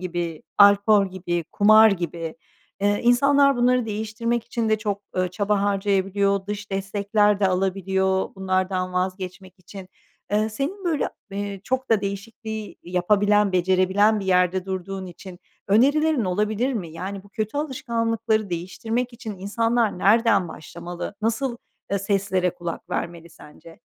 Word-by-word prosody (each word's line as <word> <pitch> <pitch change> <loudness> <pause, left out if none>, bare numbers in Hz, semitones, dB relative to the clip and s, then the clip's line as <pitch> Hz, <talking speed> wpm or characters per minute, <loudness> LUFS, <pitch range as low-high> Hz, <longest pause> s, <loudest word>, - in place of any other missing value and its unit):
gibi, 170 -3 -4 0.2
alkol 200 0 +6
gibi, 175 -2 -3
kumar 215 +1 +7
gibi. 170 -3 -4 0.4
Eee, 205 +1 +2
insanlar 275 +3 +4
bunları 245 -1 +2
değiştirmek 220 +2 -2
için 230 -2 -2
de 215 - +2
çok, 205 -2 -3
ııı, 185 0 +1
çaba 200 +2 0
harcayabiliyor, 200 0 +1
dış 205 0 -5
destekler 200 +1 +1
de 195 - +4
alabiliyor 190 +1 0
bunlardan 185 -1 -1
vazgeçmek 185 0 -4
için. 185 +1 -11 0.4
Eee, 215 +1 +2
senin 300 - -4
böyle, 320 -5 0 0.2
eee, 200 -1 -4
çok 260 0 -2
da 220 -2 +4
değişikliği 215 +2 -6
yapabilen 205 +3 +2
becerebilen 190 +4 +3
bir - - -5
yerde 180 0 +2
durduğun 190 0 -4
için 180 +1 -11 0.3
önerilerin 280 +4 +3
olabilir 210 +7 0
mi? 180 -7 -4
Yani 190 +4 -6
bu - - -16
kötü 215 +5 -3
alışkanlıkları 230 -6 -1
değiştirmek 225 +8 -3
için 220 -4 -8
insanlar 225 +1 0
nereden 205 -3 +3
başlamalı? 170 +5 -7
Nasıl, 235 +2 -1 0.4
eee, 200 - +2
seslere 195 -2 0
kulak 175 -1 -6
vermeli 170 0 -4
sence? 165 +2 -15
200 Hz, 135 wpm, -23 LUFS, 185-220 Hz, 0.4 s, kumar